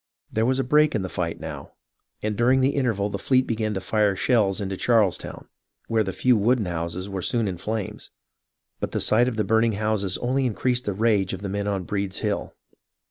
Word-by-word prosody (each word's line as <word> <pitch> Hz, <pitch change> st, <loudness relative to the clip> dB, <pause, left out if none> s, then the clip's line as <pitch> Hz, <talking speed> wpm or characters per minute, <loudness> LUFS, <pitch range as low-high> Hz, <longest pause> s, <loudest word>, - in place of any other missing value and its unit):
There 110 Hz, +2 st, +1 dB
was 130 Hz, 0 st, +2 dB
a 135 Hz, -, +1 dB
break 150 Hz, +3 st, +3 dB
in 105 Hz, -, 0 dB
the 95 Hz, -, -4 dB
fight 85 Hz, -2 st, -2 dB
now, -, -, -8 dB, 0.5 s
and 105 Hz, 0 st, -1 dB
during 125 Hz, +4 st, +3 dB
the 135 Hz, +2 st, +3 dB
interval 110 Hz, -7 st, 0 dB
the 100 Hz, -, -3 dB
fleet 130 Hz, +4 st, +2 dB
began 110 Hz, -2 st, -2 dB
to -, -, -1 dB
fire 105 Hz, +1 st, +1 dB
shells 105 Hz, -2 st, +2 dB
into 95 Hz, -1 st, -3 dB
Charlestown, 110 Hz, -3 st, 0 dB, 0.4 s
where 110 Hz, -1 st, +2 dB
the 95 Hz, -, -3 dB
few 125 Hz, +6 st, +3 dB
wooden 115 Hz, +1 st, +2 dB
houses 85 Hz, +2 st, -4 dB
were 95 Hz, -2 st, -4 dB
soon 115 Hz, +3 st, +1 dB
in 90 Hz, -2 st, -3 dB
flames, 110 Hz, -1 st, -4 dB, 0.7 s
but -, -, -4 dB
the -, -, 0 dB
sight 120 Hz, +3 st, +3 dB
of 120 Hz, -3 st, -2 dB
the 110 Hz, -, +2 dB
burning 110 Hz, +1 st, +2 dB
houses 105 Hz, -2 st, -1 dB
only 130 Hz, +2 st, 0 dB
increased 125 Hz, +2 st, -1 dB
the 100 Hz, -, -1 dB
rage 100 Hz, -2 st, +1 dB
of 95 Hz, +1 st, -6 dB
the 100 Hz, -, -3 dB
men 100 Hz, +1 st, -2 dB
on 100 Hz, -2 st, -1 dB
Breed's 100 Hz, +1 st, -3 dB
Hill. 105 Hz, -2 st, -3 dB
105 Hz, 210 wpm, -24 LUFS, 95-120 Hz, 0.7 s, break